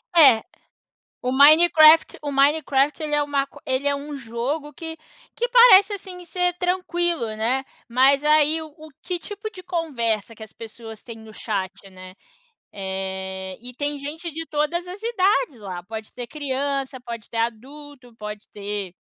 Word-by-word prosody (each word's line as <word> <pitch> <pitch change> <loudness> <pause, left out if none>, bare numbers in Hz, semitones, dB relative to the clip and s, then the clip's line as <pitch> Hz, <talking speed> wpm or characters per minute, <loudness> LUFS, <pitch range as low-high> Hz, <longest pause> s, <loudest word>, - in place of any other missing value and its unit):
É, 265 -9 +7 0.8
o 250 +1 -1
Minecraft 310 +2 +7
o 290 - -3
Minecraft, 285 +1 +2
ele 300 -1 -2
é 295 - +2
um - - -3
maco 280 0 -2
ele 260 +2 0
é 285 - +1
um 290 +1 -7
jogo 265 +5 -4
que 325 +1 -8 0.4
que 485 +1 -1
parece, 470 -5 +7
assim, 370 -2 -9
ser 360 0 0
tranquilo, 350 -5 -1
né. 250 +5 0 0.2
Mas 265 +4 +4
aí, 305 +1 +4
o 315 - -7
o 310 +1 -14
que 360 -1 -3
tipo 410 +4 -7
de 370 -3 -12
conversa 240 - -2
que 220 - -13
as 220 - -11
pessoas 225 -1 -10
têm 230 -2 -9
no 220 -1 -13
chat, 195 -4 -3 0.2
né, 185 0 -12 0.6
eh, 190 -1 -5
e 250 0 -9
tem 290 +2 -3
gente 310 +5 -6
de 325 +2 -5
todas 315 +4 -1
as 370 +3 -8
idades 410 - +1
lá, 185 -3 -6
pode 220 +2 -8
ter 245 -1 -7
criança, 275 -2 -3
pode 235 -3 -8
ter 230 - -6
adulto, 255 +3 -5
pode 210 -1 -8
ter 205 -2 -5
280 Hz, 165 wpm, -23 LUFS, 230-320 Hz, 0.8 s, É